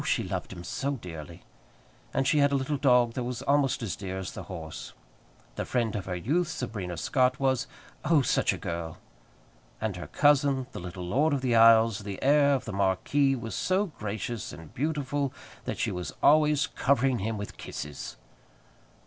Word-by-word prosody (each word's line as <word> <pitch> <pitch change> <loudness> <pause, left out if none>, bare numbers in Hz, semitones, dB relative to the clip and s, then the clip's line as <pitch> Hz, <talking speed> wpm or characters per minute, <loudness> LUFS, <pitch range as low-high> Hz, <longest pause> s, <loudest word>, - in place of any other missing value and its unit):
she - - +1
loved - - -4
him 90 -2 -8
so 140 +10 -2
dearly! 85 - -8 0.7
And 135 -1 0
she 150 - +3
had 140 0 +4
a - - +2
little 135 +2 0
dog 125 -4 +4
that 125 - -2
was 125 -1 -4
almost 140 -3 +2
as 105 - -2
dear 95 -1 -5
as 95 -1 -4
the - - -7
horse. 80 -4 -7 0.6
The - - -1
friend 115 -4 -1
of 100 -2 -3
her 90 - -2
youth, 150 - 0
Sabrina 105 - -4
Scott, 130 - +2
was 130 -1 +1 0.4
oh, 155 -3 +4
such - - +2
a - - -3
girl! 85 -1 -5 0.8
And 105 -4 -2
her 90 - -7
cousin, 140 -2 +3
the - - -7
little 90 +1 -6
Lord 140 - +2
of 140 - 0
the 125 -3 +1
Isles, 115 -1 +6
the 100 -1 -6
heir 140 0 +5
of 130 - -3
the 110 - -5
marquis, 100 +9 +2
was 115 -4 -6
so 190 - +1
gracious 110 +1 -4
and 80 -2 -11
beautiful 145 -1 -1 0.3
that - - -3
she - - 0
was 90 0 -5
always 150 -1 +5
covering 135 -1 +1
him 110 +3 -2
with 100 0 -7
kisses. 75 -1 -7
120 Hz, 185 wpm, -28 LUFS, 95-140 Hz, 0.8 s, Isles